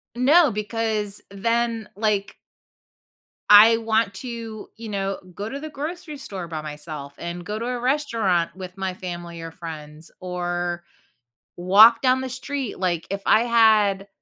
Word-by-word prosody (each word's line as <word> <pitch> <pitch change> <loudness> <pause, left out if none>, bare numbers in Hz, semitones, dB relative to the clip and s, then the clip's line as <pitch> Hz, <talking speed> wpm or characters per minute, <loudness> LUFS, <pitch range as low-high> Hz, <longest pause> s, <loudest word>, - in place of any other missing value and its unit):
No, 285 +4 +5
because 210 -1 -2
then, 230 +2 -1
like 205 -1 -1 1.1
I 215 +2 +9
want 225 -2 0
to, 230 -1 -7
you 225 0 -8
know, 195 -1 -2 0.2
go 205 +3 -5
to 275 - -5
the 310 +2 -7
grocery 305 +1 -6
store 195 -10 -7
by 160 -2 -5
myself, 150 -1 -8
and 175 +1 -6
go 210 +2 -4
to 230 - -4
a 250 0 -2
restaurant 230 - 0
with 185 -1 -9
my 190 -1 -2
family 175 -2 -7
or 165 0 -7
friends, 155 -2 -9
or 175 -1 -3 0.7
walk 210 +6 +7
down 260 0 +3
the 260 - -4
street, 260 -1 -4
like, 175 -3 -1
if 200 0 -3
I 220 - +5
had 215 -4 +3
210 Hz, 150 wpm, -23 LUFS, 175-235 Hz, 1.1 s, I